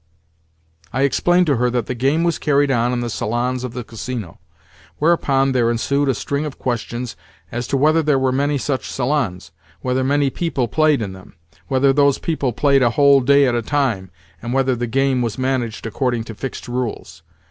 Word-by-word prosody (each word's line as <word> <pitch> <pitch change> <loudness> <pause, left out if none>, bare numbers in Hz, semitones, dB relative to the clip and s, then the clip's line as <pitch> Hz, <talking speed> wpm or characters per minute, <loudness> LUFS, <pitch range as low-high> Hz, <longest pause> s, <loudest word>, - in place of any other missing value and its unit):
I 135 - 0
explained 175 +6 +3
to 145 -5 +1
her 125 +1 +2
that 120 -2 -1
the - - -3
game 135 +7 +1
was 170 -1 0
carried 145 -2 +2
on 120 -1 +1
in 125 -1 -1
the 120 - -2
salons 120 +4 -2
of 125 -2 -5
the 125 0 -5
Casino; 115 -5 -6 0.6
whereupon 140 -4 +2
there 120 -3 +2
ensued 140 +4 0
a 130 - +1
string 140 +6 -2
of 150 -3 -6
questions 120 0 -3 0.4
as 120 +1 -4
to 140 - 0
whether 155 +4 +3
there 150 -3 +2
were 130 -1 +1
many 140 +2 0
such 135 0 -3
salons, 125 - -2 0.3
whether 130 0 0
many 140 +1 +1
people 150 -7 -1
played 155 0 +2
in 95 -2 -5
them, 95 +2 -14 0.3
whether 135 0 +3
those 140 -1 +3
people 145 -6 -1
played 135 +4 +2
a 120 - +4
whole 140 +2 +5
day 140 +2 +4
at 125 - +1
a 120 - 0
time, 115 -7 -1 0.3
and 120 - -4
whether 135 -1 +2
the 120 0 -3
game 135 +1 +1
was 115 -3 -2
managed 130 -4 -2
according 120 +1 -1
to 115 - -8
fixed 130 +5 -6
rules. 120 - -4
130 Hz, 195 wpm, -20 LUFS, 120-140 Hz, 0.6 s, whole